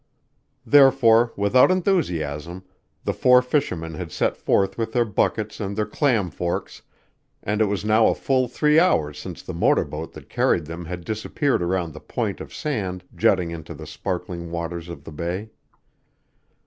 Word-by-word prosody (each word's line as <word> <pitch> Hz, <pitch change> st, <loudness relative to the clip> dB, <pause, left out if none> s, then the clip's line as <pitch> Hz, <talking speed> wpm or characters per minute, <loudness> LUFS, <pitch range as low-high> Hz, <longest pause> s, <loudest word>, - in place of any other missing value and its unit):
Therefore, 125 Hz, -5 st, +5 dB
without 100 Hz, -, +4 dB
enthusiasm, 90 Hz, -, -1 dB, 0.4 s
the -, -, -1 dB
four 125 Hz, 0 st, +5 dB
fishermen 90 Hz, -, -1 dB
had 85 Hz, -1 st, -6 dB
set -, -, 0 dB
forth 95 Hz, 0 st, +1 dB
with 115 Hz, -1 st, -3 dB
their 120 Hz, -1 st, +3 dB
buckets 105 Hz, 0 st, -1 dB
and 100 Hz, -2 st, -3 dB
their 105 Hz, 0 st, 0 dB
clam 105 Hz, -, +1 dB
forks, 85 Hz, +2 st, -4 dB, 0.6 s
and 105 Hz, +2 st, -1 dB
it -, -, +5 dB
was 100 Hz, 0 st, -2 dB
now 110 Hz, +1 st, +4 dB
a -, -, +2 dB
full 130 Hz, -2 st, +1 dB
three 150 Hz, +5 st, +3 dB
hours 80 Hz, -, +2 dB
since -, -, -8 dB
the -, -, -6 dB
motor -, -, +2 dB
boat 80 Hz, +2 st, -7 dB
that -, -, -12 dB
carried 85 Hz, -, +1 dB
them 85 Hz, +2 st, -7 dB
had 90 Hz, 0 st, -6 dB
disappeared 110 Hz, -, -1 dB
around 85 Hz, -2 st, -1 dB
the 75 Hz, -, -9 dB
point -, -, -3 dB
of -, -, -9 dB
sand 95 Hz, -11 st, -3 dB
jutting 90 Hz, 0 st, +2 dB
into 80 Hz, -2 st, -8 dB
the -, -, -9 dB
sparkling 90 Hz, -2 st, -5 dB
waters 85 Hz, 0 st, -5 dB
of 75 Hz, -5 st, -9 dB
the 80 Hz, -, -10 dB
bay. 90 Hz, +8 st, -4 dB
95 Hz, 165 wpm, -23 LUFS, 85-120 Hz, 0.6 s, Therefore